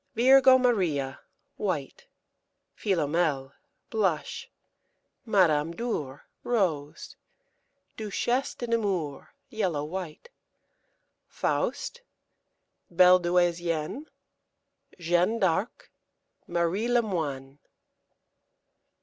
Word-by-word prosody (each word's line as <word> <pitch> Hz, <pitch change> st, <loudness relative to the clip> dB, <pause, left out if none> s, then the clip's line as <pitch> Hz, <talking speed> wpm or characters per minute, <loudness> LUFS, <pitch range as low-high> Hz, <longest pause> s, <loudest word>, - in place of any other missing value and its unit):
Virgo 260 Hz, +2 st, +7 dB
Maria, 175 Hz, -, 0 dB, 0.4 s
white. 485 Hz, +1 st, -4 dB, 0.7 s
Philomèle, 155 Hz, -7 st, 0 dB, 0.4 s
blush. 190 Hz, -8 st, -1 dB, 0.8 s
Madame 165 Hz, -7 st, +3 dB
Dhour, 155 Hz, -, -4 dB, 0.2 s
rose. 165 Hz, -11 st, -2 dB, 0.8 s
Duchesse 240 Hz, +5 st, -1 dB
de 240 Hz, -, -5 dB
Nemours, 195 Hz, -, -2 dB, 0.2 s
yellow 185 Hz, -10 st, -1 dB
white. 175 Hz, -, -7 dB, 1.0 s
Faust. 485 Hz, -, -2 dB, 0.9 s
Belle 180 Hz, +1 st, +6 dB
Douaisienne. 175 Hz, -, 0 dB, 0.9 s
Jeanne 175 Hz, +5 st, +1 dB
d'Arc. 190 Hz, +2 st, -1 dB, 0.6 s
Marie 175 Hz, +6 st, 0 dB
Lemoine. 160 Hz, -, -1 dB
180 Hz, 65 wpm, -27 LUFS, 155-225 Hz, 1.0 s, Virgo